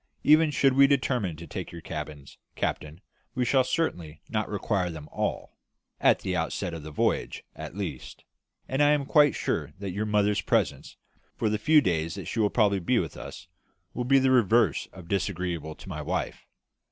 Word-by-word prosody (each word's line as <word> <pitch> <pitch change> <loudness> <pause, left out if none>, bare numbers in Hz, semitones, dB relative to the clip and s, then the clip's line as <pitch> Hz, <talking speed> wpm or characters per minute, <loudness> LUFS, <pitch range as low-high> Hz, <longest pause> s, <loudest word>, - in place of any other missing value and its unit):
"Even 155 +1 +6
should 135 -2 +3
we 140 +1 +6
determine 125 - 0
to 85 +2 -9
take 75 - -6
your 85 - -8
cabins, 75 -3 -7 0.2
captain, 75 +4 -3 0.3
we 125 -1 +1
shall 130 +2 +3
certainly 85 - -2
not 110 -2 -2
require 100 -3 -1
them 80 -3 -8
all - - -3 0.4
at - - +4
the 95 - -2
outset 85 +2 -2
of 80 - -6
the 75 - -8
voyage, 75 - -1
at 95 - -8
least 85 -10 -6 0.4
and 135 +2 0
I 145 0 +5
am 145 -2 0
quite 145 0 +4
sure - - -2
that 100 0 -5
your 105 +4 -2
mother's 105 -1 +2
presence, - - -1 0.4
for 110 - 0
the 105 - 0
few 155 +6 +5
days 80 - -1
that 95 -3 -7
she 115 - -4
will 105 -2 +3
probably 100 -4 +2
be 120 +8 +1
with 80 -8 -2
us, - - -9 0.5
will 125 - -2
be 135 +2 +5
the 130 -1 +3
reverse 120 -2 +3
of 90 -3 -12
disagreeable 90 -5 -2
to - - -14
my - - -5
wife. - - -3
100 Hz, 190 wpm, -27 LUFS, 85-130 Hz, 0.5 s, Even